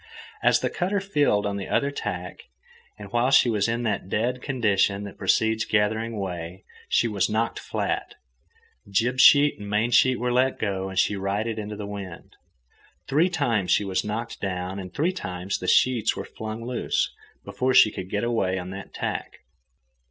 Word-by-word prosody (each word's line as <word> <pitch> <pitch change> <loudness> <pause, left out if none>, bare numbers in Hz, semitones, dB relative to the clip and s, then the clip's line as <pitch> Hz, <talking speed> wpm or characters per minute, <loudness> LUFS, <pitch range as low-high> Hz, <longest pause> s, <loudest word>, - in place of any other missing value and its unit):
As - - +4
the - - 0
cutter 195 +3 -1
filled 145 - +1
on 100 -1 -2
the 100 - -5
other 140 0 +1
tack, 90 -10 -6 0.5
and 100 -2 -10
while 120 +2 +2
she 130 -3 +5
was 105 -1 +1
in 115 +1 -1
that 105 -4 -2
"dead" 125 +5 -1
condition 105 -7 +1
that 100 - -9
precedes 110 +3 +2
gathering 110 +2 0
way, 90 -2 -5 0.3
she - - +3
was 105 -4 0
knocked 110 +2 -1
flat. - - -3 0.7
Jib 120 +6 +1
sheet 145 +1 +6
and 100 0 -7
main 105 +3 +1
sheet 130 +1 +4
were 125 0 0
let 130 +1 +2
go, 95 -2 -2
and 95 - -8
she 100 - +2
righted 105 +3 -2
into 105 0 -5
the 105 0 -6
wind. 100 -4 -8 0.7
Three 155 +7 +2
times 120 - 0
she 105 - +3
was 95 -1 -1
knocked 110 +3 -5
down, 95 0 -3
and 90 -1 -7
three 170 +6 0
times 90 - -4
the 90 - -5
sheets 120 -1 +3
were - - -5
flung 110 +1 -7
loose, 125 -1 -1 0.3
before 130 0 0
she 110 - +7
could 95 -2 -7
get 105 +2 -1
away 110 -6 0
on 90 0 -6
that 95 0 -9
tack. - - -4
105 Hz, 180 wpm, -25 LUFS, 95-120 Hz, 0.7 s, she